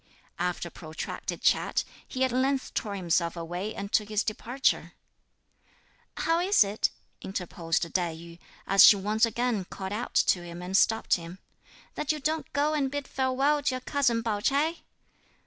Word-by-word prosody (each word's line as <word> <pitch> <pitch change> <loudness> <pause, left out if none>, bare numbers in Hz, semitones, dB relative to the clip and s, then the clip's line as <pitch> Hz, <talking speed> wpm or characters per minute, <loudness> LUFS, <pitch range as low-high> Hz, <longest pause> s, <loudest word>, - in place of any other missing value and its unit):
After 175 0 -2
a - - -27
protracted 160 -2 -6
chat, - - +2 0.2
he 260 - -1
at 260 - +2
length 265 +2 0
tore 205 -2 -2
himself 170 -2 0
away 175 +6 -4
and 200 +1 -6
took 210 -1 +1
his 215 0 +1
departure. 245 +5 -1 1.2
"How 330 +1 +1
is 370 - +5
it," 205 +2 0 0.3
interposed 175 -3 -2
Tai 175 -3 0
yü, 170 +1 -12 0.3
as 195 0 +6
she - - +10
once 210 +3 +2
again 235 -2 -1
called 190 +2 -6
out 220 +3 -4
to 180 - +3
him 170 0 -8
and 185 +2 -3
stopped 220 +1 +3
him, 170 +1 -9 0.6
"that 300 - -1
you 305 - -3
don't 310 +2 -2
go 295 +2 +1
and 280 -3 +1
bid 285 0 -4
farewell 270 +3 +1
to 270 -2 0
your 255 - -5
cousin 245 -4 +1
Pao 215 -3 -1
Ch'ai?" 295 +9 +1
215 Hz, 165 wpm, -28 LUFS, 180-270 Hz, 1.2 s, she